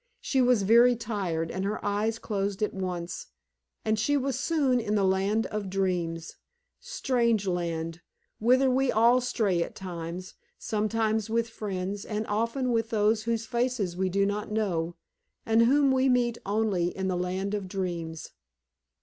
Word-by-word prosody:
She 265 - +1
was 245 -4 +4
very 235 +4 +6
tired, 190 -8 -2
and 190 - -3
her 205 +2 -2
eyes 210 +2 0
closed 200 -2 -2
at 210 - -1
once, 180 -2 -4 0.6
and 215 0 +1
she 290 +7 +2
was 270 -1 -1
soon 280 -5 +2
in 215 -2 -1
the 200 - +2
land 195 +4 +2
of 210 -2 -4
dreams 175 -4 -2 0.4
strange 240 - 0
land, 170 -2 -2 0.4
whither 255 +4 +4
we 260 0 +2
all 235 +3 +4
stray 215 -8 0
at - - -4
times, 180 0 -6 0.2
sometimes 220 0 0
with 230 +1 0
friends, 200 -2 -4
and 215 0 -3
often 230 +5 -1
with 225 -1 0
those 215 0 +2
whose 230 -1 -1
faces 235 -7 -1
we 190 +1 0
do 200 +2 +2
not 205 +1 -2
know, 175 -6 -1 0.5
and 225 +1 +4
whom 275 +2 +4
we 265 0 +3
meet 240 -2 +2
only 200 -4 +1
in 190 0 -1
the 185 - 0
land 185 +3 -2
of 205 -2 -2
dreams. 170 -4 -4
210 Hz, 160 wpm, -28 LUFS, 185-235 Hz, 0.6 s, very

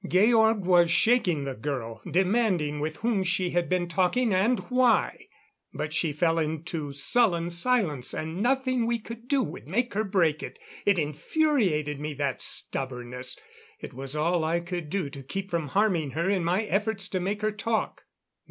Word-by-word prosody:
Georg 220 +1 +4
was 175 -2 +5
shaking 180 - +3
the 135 -1 -3
girl, 115 -4 -5
demanding 185 -5 +1
with 155 +1 -3
whom 225 -3 0
she 180 -1 0
had 175 -1 0
been 180 -1 0
talking 190 +6 +1
and 215 +7 +3
why. 250 +2 +1 0.5
But 150 +1 -4
she 160 0 +1
fell 165 +2 +1
into 155 -1 -3
sullen 170 - +2
silence, 170 - +1
and 160 +4 -4
nothing 255 -1 +1
we 235 0 +1
could 230 +1 -10
do 275 -1 +2
would 120 - -8
make 240 +9 -1
her 215 +2 0
break 175 -7 +1
it. - - -7 0.3
It 200 -2 +4
infuriated 155 - 0
me, 150 0 -4
that 140 -2 -2
stubbornness; 125 -1 -2 0.4
it - - -9
was 135 +3 -5
all 165 +2 +1
I 165 +2 +1
could 175 -2 -5
do 185 -2 -1
to 140 -1 -9
keep 190 +9 -5
from 165 -3 -1
harming 185 -5 +1
her 170 +2 0
in 195 -3 +1
my 180 +5 +1
efforts 205 -1 -1
to 185 - -1
make 200 +3 -3
her 215 - +2
talk. 220 +2 -2
175 Hz, 170 wpm, -27 LUFS, 150-215 Hz, 0.5 s, was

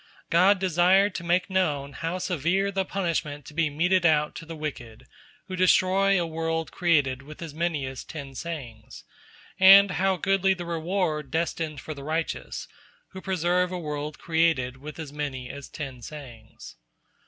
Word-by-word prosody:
God 185 +4 +5
desired 185 +2 +3
to 170 - -5
make 175 +2 +1
known 150 -8 0
how 165 +4 -3
severe 180 +2 0
is - - -7
the 190 0 +1
punishment 165 -7 -2
to 150 - -11
be 160 -1 +1
meted 175 +5 +2
out 150 -2 +3
to 165 - -9
the 165 - -6
wicked, 130 -8 -7 0.4
who 185 - -5
destroy 185 +1 +4
a 170 - 0
world 165 0 -2
created 145 -7 +1
with 150 +2 -12
as 160 -3 -7
many 160 -3 -1
as 130 -1 -6
ten 140 -4 -8
Sayings, 130 -8 -7 0.6
and 195 +1 +9
how 190 +2 +1
goodly 195 +1 +2
the 175 -1 -6
reward 165 -3 -1
destined 160 -1 -2
for 155 - -6
the 140 -2 -10
righteous, 160 +2 -3 0.4
who 190 - -9
preserve 180 -1 +1
a 180 - -3
world 150 -2 -4
created 160 -6 +1
with 150 +3 -9
as 155 -3 -7
many 135 -4 -4
as 140 -1 -9
ten 135 -4 -7
Sayings. 120 - -11
165 Hz, 165 wpm, -26 LUFS, 145-180 Hz, 0.6 s, and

